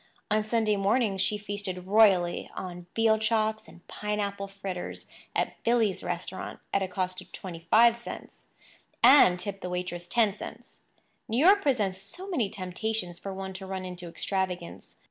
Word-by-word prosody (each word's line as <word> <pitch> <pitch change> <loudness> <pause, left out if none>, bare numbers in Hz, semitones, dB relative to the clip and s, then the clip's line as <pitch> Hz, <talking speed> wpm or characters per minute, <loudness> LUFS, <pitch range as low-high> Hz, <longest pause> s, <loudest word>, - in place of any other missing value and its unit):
On 215 0 +3
Sunday 215 -1 +1
mornings 200 0 +2
she 210 +2 +1
feasted 200 -3 -5
royally 190 -4 +4
on 175 -1 -7
veal 225 -1 +4
chops 220 0 0
and 175 - -17
pineapple 205 -1 -3
fritters 195 -2 -6 0.3
at - - -1
"Billy's" 230 -5 +2
restaurant, 180 +1 -5
at 200 - +3
a 190 - 0
cost 185 0 -2
of - - -16
twenty 170 -3 -8
five 235 +3 +7
cents—and 235 -3 +2
tipped 195 0 -5
the 180 - -4
waitress 180 -1 -4
ten 215 0 +2
cents. - - -10 0.5
New 230 0 -1
York 385 +9 +6
presents 205 - 0
so 350 - -9
many 260 - 0
temptations 185 -1 -3
for 195 - -6
one 190 0 -5
to 190 0 -8
run 190 -1 -4
into 180 -1 -6
extravagance. 180 0 -4
195 Hz, 155 wpm, -28 LUFS, 185-220 Hz, 0.5 s, five